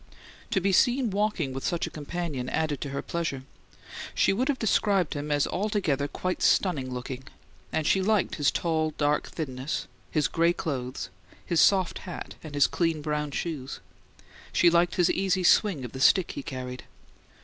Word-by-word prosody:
To - - +2
be 195 +1 +1
seen 245 +3 +3
walking 195 -9 0
with 135 - -5
such 170 - 0
a - - -7
companion 150 -4 -4
added 155 -4 -1
to 140 - -3
her 140 0 -4
pleasure. 165 -6 -3 0.7
She - - +3
would 245 +6 0
have 285 -3 +1
described 200 -6 +2
him 145 +1 -4
as 145 -1 +2
"altogether 185 -9 0
quite 185 +4 -3
stunning 140 -9 +2
looking"; 125 +1 -6 0.5
and 160 - -1
she 190 - +3
liked 205 -2 +1
his 145 -3 +3
tall, 160 -2 0
dark 150 0 +1
thinness, 140 0 -4 0.2
his 155 -2 +1
gray 170 +1 +2
clothes, 130 - -4 0.3
his 170 -3 +2
soft 190 -3 +3
hat, 180 - -7
and 155 -2 -8
his 145 - +5
clean 165 -3 0
brown 150 -1 -1
shoes; 140 -2 -4 0.7
she 170 - +5
liked 175 +1 +3
his 175 -2 +3
easy 190 -1 +1
swing 175 - +4
of 120 - -7
the 130 - -7
stick 185 +5 +5
he - - -5
carried. 125 -2 -6
160 Hz, 170 wpm, -27 LUFS, 140-185 Hz, 0.7 s, his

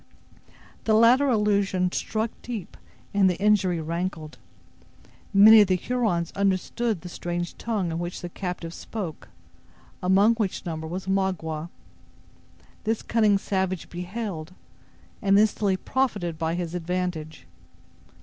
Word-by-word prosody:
The 220 - +3
latter 240 +5 +5
allusion 200 -5 +1
struck 220 +4 -2
deep, 230 -6 -6 0.4
and 195 -2 +4
the 180 - -1
injury 195 -4 +3
rankled. 165 -1 -4 0.9
Many 215 +2 +9
of 205 - +4
the 185 - +3
Hurons 185 -6 -1
understood 200 +1 0
the 180 - -8
strange 175 0 -4
tongue 205 -7 -1
in 165 - -3
which 175 +1 -5
the 175 - -5
captive 180 -2 -5
spoke, 185 -8 -6 0.7
among 195 +5 +4
which 205 -5 -2
number 160 -2 -4
was 180 +3 -5
Magua. 180 -5 -1 1.1
This 220 0 -1
cunning 215 -3 +3
savage 190 -2 -2
beheld, 180 -2 -5 0.7
and 200 -1 +4
instantly 205 -2 +2
profited 205 -10 -1
by 165 +1 -1
his 175 -1 -4
advantage. 175 - -3
190 Hz, 120 wpm, -25 LUFS, 175-210 Hz, 1.1 s, Many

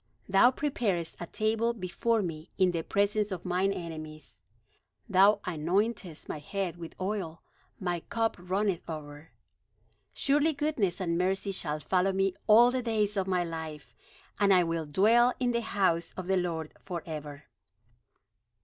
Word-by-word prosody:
Thou 195 +5 +6
preparest 220 - -1
a 175 - -5
table 225 +3 0
before 220 +2 0
me 165 -2 -6
in 185 -2 +4
the 170 -1 -2
presence 205 +3 0
of 185 -1 -5
mine 185 +2 +1
enemies; 155 -4 -8 0.7
Thou 200 +1 +5
anointest 180 +2 -1
my 155 - -4
head 185 +2 -3
with 170 -1 -9
oil; 185 -4 -3 0.4
my 175 -2 -1
cup 225 -1 0
runneth 185 +1 -1
over. 150 -1 -8 0.8
Surely 295 +3 +2
goodness 275 - -1
and 170 -2 0
mercy 190 +2 0
shall 155 -5 -2
follow 185 +5 +1
me 195 0 +1
all 235 +3 +7
the 255 0 -1
days 215 -3 0
of 195 -1 0
my 180 -2 +1
life: 160 -6 -7 0.5
And 200 -1 +4
I 180 -2 +6
will 165 -2 -2
dwell 230 +10 +4
in 250 -1 +1
the 235 0 0
house 185 -6 0
of 185 - -4
the 190 +1 +1
Lord 165 -3 -2
forever." 155 -5 -6
185 Hz, 150 wpm, -29 LUFS, 165-210 Hz, 0.8 s, all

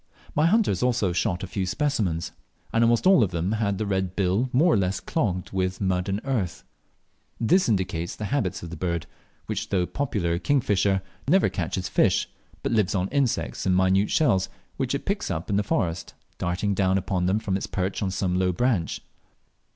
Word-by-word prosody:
My 150 +2 +3
hunters 200 - +2
also 120 -7 +1
shot 95 0 0
a - - -4
few 95 0 -2
specimens, 105 - -1 0.4
and 115 - +3
almost 115 +4 +3
all 190 -7 +6
of 100 - +1
them 85 +2 -2
had 105 -3 0
the 110 - -2
red 95 -2 -1
bill 100 +6 +1
more 155 +6 +4
or - - +4
less 95 0 0
clogged 100 - -2
with 95 -1 -1
mud 95 -1 0
and 100 +1 0
earth. 110 -11 -2 0.8
This 175 - +3
indicates 90 -5 -1
the 105 - -5
habits 105 - -1
of 85 - -7
the - - -5
bird, 85 -1 -2 0.4
which, - - -3
though 90 -3 +1
popularly 90 -10 -1
a - - -5
king 145 +7 +2
fisher, 100 -4 +1 0.2
never 185 +6 +4
catches 90 +1 -3
fish, - - +2 0.4
but - - -1
lives 105 -3 +2
on 95 0 0
insects 110 - 0
and 95 - +3
minute 95 +2 +3
shells, 95 -12 +2 0.3
which 135 0 -1
it 140 - -5
picks 200 0 -1
up 90 +1 -3
in - - +2
the - - +3
forest, 85 -4 -2 0.2
darting 90 +4 0
down 95 -1 +2
upon 90 -2 -1
them 95 +3 +2
from 100 -3 -2
its 95 - -2
perch 95 0 -2
on 100 - 0
some 90 -1 0
low 90 -1 +2
branch. 100 - 0
95 Hz, 195 wpm, -25 LUFS, 90-115 Hz, 0.8 s, all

